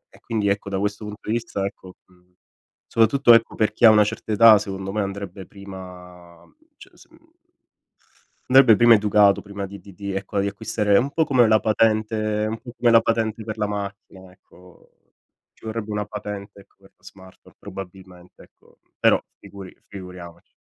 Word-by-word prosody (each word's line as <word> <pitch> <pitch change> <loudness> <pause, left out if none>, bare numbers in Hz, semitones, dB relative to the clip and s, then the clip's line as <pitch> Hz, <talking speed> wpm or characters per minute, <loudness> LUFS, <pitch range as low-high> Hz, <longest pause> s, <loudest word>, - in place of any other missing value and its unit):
e - - -19
quindi 110 -3 -3
ecco 100 0 -1
da 95 - -3
questo 105 +2 -3
punto 105 +1 -9
di - - -1
vista 115 -4 -3
ecco, 95 -2 -9
mhmm, 90 0 -29 0.5
soprattutto 120 +2 +4
ecco 115 0 +2
per 110 - 0
chi 120 - +2
ha - - +10
una 105 -1 +5
certa 105 +1 -5
età 110 -1 +7
secondo 95 -2 -6
me 105 - -2
andrebbe 100 -1 -7
prima 90 -3 -13 0.3
c - - -15
s - - -20
mhmm, 325 - -24 1.2
andrebbe 130 -4 +7
prima 120 0 +6
educato 105 -1 +3
prima 100 -1 -7
di 100 +1 -11
di 100 - -15
di 100 +1 -6
ecco, 100 +1 -4
di 100 - -1
acquistare 105 0 0
un 135 +3 -1
po' 160 - +1
come 125 -5 +3
la 110 - +4
patente 110 -1 0
un 110 0 -5
po' 120 - -10
come 120 -1 +3
la 115 - +7
patente 115 -1 -2
per 110 0 -6
la 105 - 0
macchina, 100 -2 -8
ecco. 90 -1 -22 0.6
Ci - - -23
vorrebbe 110 -1 -5
una 105 0 -2
patente 105 -1 -8
ecco, 100 - -23
per 95 - -22
la - - -40
smartphone 95 -1 -17
probabilmente, 90 -1 -12
ecco, - - -27 0.2
però - - +4 0.2
figuri 100 -2 -12
figuriamoci. 90 -3 -11
100 Hz, 180 wpm, -22 LUFS, 95-110 Hz, 1.2 s, ha